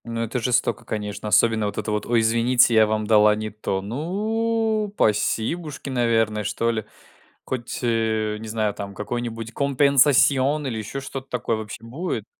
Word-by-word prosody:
Ну 115 Hz, 0 st, -4 dB
это 115 Hz, +2 st, -2 dB
жестоко, 120 Hz, +1 st, 0 dB
конечно. 105 Hz, 0 st, -5 dB
Особенно 110 Hz, 0 st, +3 dB
вот 100 Hz, -, -6 dB
это 110 Hz, -, -2 dB
вот: 105 Hz, 0 st, -2 dB
"Ой, 115 Hz, -1 st, +3 dB
извините, 115 Hz, +2 st, +3 dB
я 110 Hz, -1 st, +5 dB
вам 110 Hz, 0 st, -1 dB
дала 105 Hz, -1 st, +5 dB
не 110 Hz, 0 st, -5 dB
то". 95 Hz, -2 st, -3 dB
Ну, 215 Hz, -, -1 dB
пасибушки, 135 Hz, +8 st, 0 dB
наверное, 115 Hz, -4 st, +1 dB
что 110 Hz, +3 st, 0 dB
ли. 110 Hz, -2 st, -3 dB, 0.6 s
Хоть, 120 Hz, -2 st, -4 dB
э, 110 Hz, -2 st, 0 dB
не 110 Hz, -, -8 dB
знаю, 110 Hz, -1 st, -1 dB
там 100 Hz, -1 st, -7 dB
какой-нибудь 115 Hz, +1 st, -5 dB
компенсасион 140 Hz, +1 st, +3 dB
или 115 Hz, -4 st, -3 dB
еще 110 Hz, +6 st, -5 dB
что-то 135 Hz, 0 st, -7 dB
такое 115 Hz, -2 st, -1 dB
вообще 110 Hz, +1 st, -8 dB
будет? 145 Hz, +11 st, -4 dB
115 Hz, 160 wpm, -23 LUFS, 110-135 Hz, 0.6 s, я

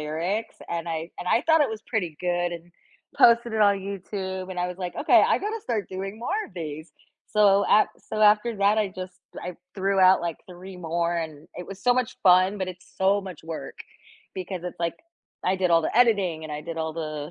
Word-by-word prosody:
lyrics, 170 Hz, +9 st, -3 dB
and 170 Hz, 0 st, -3 dB
I 165 Hz, +1 st, -4 dB
and 180 Hz, -, -6 dB
I -, -, +4 dB
thought 320 Hz, -2 st, +5 dB
it -, -, +1 dB
was 215 Hz, -, -12 dB
pretty 185 Hz, -10 st, -2 dB
good 175 Hz, -1 st, 0 dB
and 170 Hz, 0 st, -9 dB, 0.5 s
posted 235 Hz, 0 st, +5 dB
it 220 Hz, -, 0 dB
on 200 Hz, -1 st, +4 dB
YouTube, 190 Hz, -1 st, -5 dB
and 180 Hz, -1 st, -3 dB
I 180 Hz, -, 0 dB
was, 180 Hz, -, -6 dB
like, 180 Hz, -2 st, -4 dB
okay, -, -, +6 dB
I -, -, +3 dB
gotta 430 Hz, +2 st, -3 dB
start 220 Hz, -6 st, -2 dB
doing 195 Hz, +3 st, -5 dB
more 370 Hz, -, -1 dB
of -, -, -20 dB
these. 155 Hz, -2 st, -7 dB, 0.4 s
So 200 Hz, -1 st, +5 dB
a 215 Hz, -, +5 dB
so 215 Hz, -, -5 dB
after 215 Hz, +2 st, +4 dB
that, 200 Hz, +2 st, +3 dB
I 210 Hz, -, +1 dB
just, 185 Hz, -1 st, -8 dB, 0.2 s
I 180 Hz, 0 st, -6 dB, 0.2 s
threw 195 Hz, 0 st, 0 dB
out, 185 Hz, 0 st, +6 dB
like, 170 Hz, -2 st, -3 dB
3 185 Hz, +1 st, -10 dB
more, 170 Hz, 0 st, -1 dB
and 155 Hz, -3 st, -5 dB
it 180 Hz, -, -7 dB
was 195 Hz, 0 st, -10 dB
so 245 Hz, -, +5 dB
much 250 Hz, -2 st, -1 dB
fun, 185 Hz, +2 st, +5 dB
but 190 Hz, -1 st, -2 dB
it's 185 Hz, 0 st, -10 dB
so 195 Hz, +2 st, +3 dB
much 185 Hz, -5 st, -9 dB
work, 165 Hz, -1 st, -7 dB, 0.6 s
because 185 Hz, -1 st, -5 dB
it's, 180 Hz, -, -6 dB
like, 170 Hz, -1 st, -1 dB, 0.5 s
I 185 Hz, -, +2 dB
did 180 Hz, -2 st, +1 dB
all 165 Hz, 0 st, +5 dB
the 155 Hz, -, -2 dB
editing, 200 Hz, -9 st, +3 dB
and 155 Hz, -, -6 dB
I 150 Hz, -, -4 dB
did 165 Hz, +1 st, -6 dB
all 160 Hz, 0 st, -2 dB
the 155 Hz, -2 st, -5 dB
185 Hz, 220 wpm, -25 LUFS, 170-205 Hz, 0.6 s, okay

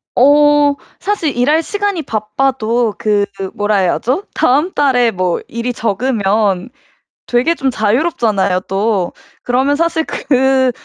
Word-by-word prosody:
어 290 Hz, +2 st, +4 dB, 0.2 s
사실 390 Hz, -8 st, -1 dB
일할 295 Hz, +7 st, +2 dB
시간이 405 Hz, -3 st, -2 dB
바빠도 230 Hz, 0 st, -1 dB
그 205 Hz, -1 st, +1 dB, 0.3 s
뭐라 205 Hz, 0 st, 0 dB
해야죠 245 Hz, -, 0 dB
다음 295 Hz, +8 st, +2 dB
달에 255 Hz, -6 st, +2 dB
뭐 185 Hz, -4 st, -1 dB
일이 235 Hz, +2 st, -4 dB
적으면 210 Hz, -3 st, 0 dB, 0.6 s
되게 250 Hz, +8 st, +1 dB
좀 270 Hz, -4 st, -1 dB
자유롭잖아요 215 Hz, -, 0 dB
또. 195 Hz, -2 st, 0 dB, 0.3 s
그러면 260 Hz, +4 st, +1 dB
사실 330 Hz, +1 st, 0 dB
그 265 Hz, -1 st, +1 dB
245 Hz, 240 characters per minute, -15 LUFS, 210-290 Hz, 0.6 s, 어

